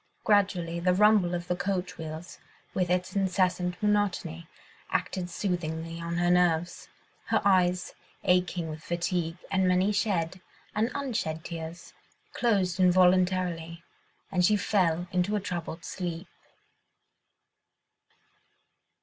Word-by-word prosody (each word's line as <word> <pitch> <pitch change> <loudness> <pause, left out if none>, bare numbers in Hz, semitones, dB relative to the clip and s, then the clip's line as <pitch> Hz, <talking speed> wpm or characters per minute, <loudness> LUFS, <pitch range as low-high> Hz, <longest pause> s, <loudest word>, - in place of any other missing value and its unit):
Gradually 185 -5 +2
the 180 +1 +2
rumble 205 -3 +4
of 175 0 -5
the 180 - 0
coach 180 -1 -3
wheels, 160 +2 -7 0.3
with 180 -2 0
its 180 +2 0
incessant 185 -2 +1
monotony, 195 -6 0 0.4
acted 180 +2 -2
soothingly 165 -3 -3
on 170 0 -3
her 175 0 +2
nerves: 175 -1 +1 0.4
her - - +2
eyes, 180 -2 +3 0.3
aching 180 -1 +1
with 155 0 -7
fatigue 170 0 -2
and 190 -1 +2
many 185 +3 +3
shed 185 -4 -1 0.3
and 220 +3 +1
unshed 225 - -2
tears, 165 +1 -7 0.4
closed 195 -6 +1
involuntarily, 180 -2 +3 0.5
and 180 -2 +2
she 210 +4 +5
fell 180 -4 +1
into 185 +2 +1
a - - +1
troubled 170 -3 -5
sleep. 175 -1 -5
180 Hz, 115 wpm, -28 LUFS, 170-190 Hz, 0.5 s, she